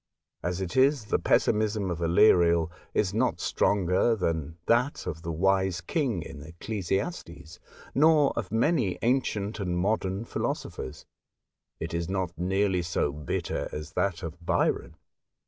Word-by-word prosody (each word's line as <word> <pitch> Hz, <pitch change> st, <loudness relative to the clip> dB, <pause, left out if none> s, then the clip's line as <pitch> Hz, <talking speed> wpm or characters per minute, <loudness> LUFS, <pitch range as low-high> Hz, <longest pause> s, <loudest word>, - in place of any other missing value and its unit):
As 90 Hz, +1 st, -2 dB
it 95 Hz, +5 st, -4 dB
is, 130 Hz, -2 st, +4 dB
the -, -, 0 dB
pessimism 105 Hz, -3 st, +1 dB
of 85 Hz, -, -3 dB
Aleriel 85 Hz, -1 st, +4 dB, 0.2 s
is 100 Hz, -2 st, 0 dB
not 120 Hz, +4 st, +1 dB
stronger 95 Hz, +3 st, +2 dB
than 80 Hz, -5 st, -2 dB
that 125 Hz, +5 st, +1 dB
of 80 Hz, -3 st, -5 dB
the 85 Hz, 0 st, -4 dB
Wise 95 Hz, +2 st, +1 dB
King 120 Hz, -, -1 dB
in 75 Hz, -3 st, -9 dB
Ecclesiastes, 90 Hz, -, -4 dB, 0.3 s
nor 150 Hz, 0 st, +5 dB
of 110 Hz, -5 st, -4 dB
many 115 Hz, -, +1 dB
ancient 110 Hz, -4 st, 0 dB
and 90 Hz, -3 st, -1 dB
modern 95 Hz, +2 st, 0 dB
philosophers. 65 Hz, -, -4 dB, 0.7 s
It 80 Hz, 0 st, -5 dB
is 85 Hz, +1 st, -2 dB
not 95 Hz, -2 st, -2 dB
nearly 95 Hz, +2 st, +1 dB
so 80 Hz, -3 st, 0 dB
bitter 75 Hz, -1 st, -3 dB
as 75 Hz, +1 st, -6 dB
that 95 Hz, -4 st, -1 dB
of 85 Hz, +1 st, -7 dB
Byron. -, -, 0 dB
95 Hz, 135 wpm, -28 LUFS, 85-110 Hz, 0.7 s, nor